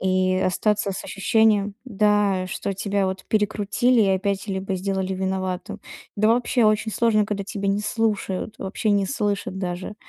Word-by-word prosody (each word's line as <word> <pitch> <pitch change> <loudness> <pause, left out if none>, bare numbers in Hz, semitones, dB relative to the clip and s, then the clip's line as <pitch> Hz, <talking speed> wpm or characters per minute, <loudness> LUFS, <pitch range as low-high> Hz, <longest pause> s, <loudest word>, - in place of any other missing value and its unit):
и 185 0 +2
остаться 210 +2 +1
с 190 - -6
ощущением, 210 0 +2
да, 205 -4 +2
что 195 - -3
тебя 200 0 0
вот 190 0 -4
перекрутили 215 +3 +2
и 200 - +2
опять 195 +1 -1
либо 190 0 -2
сделали 190 0 -2
виноватым. 190 -1 -3 0.4
Да 215 +1 +3
вообще 240 +1 +2
очень 215 +1 +2
сложно, 220 -3 +3
когда 200 -1 -3
тебе 200 0 -3
не 200 +1 +1
слушают, 210 -2 -2
вообще 195 +3 -2
не 200 -1 +2
слышат 205 -5 -2
даже. 180 +2 -4
200 Hz, 155 wpm, -23 LUFS, 190-215 Hz, 0.4 s, Да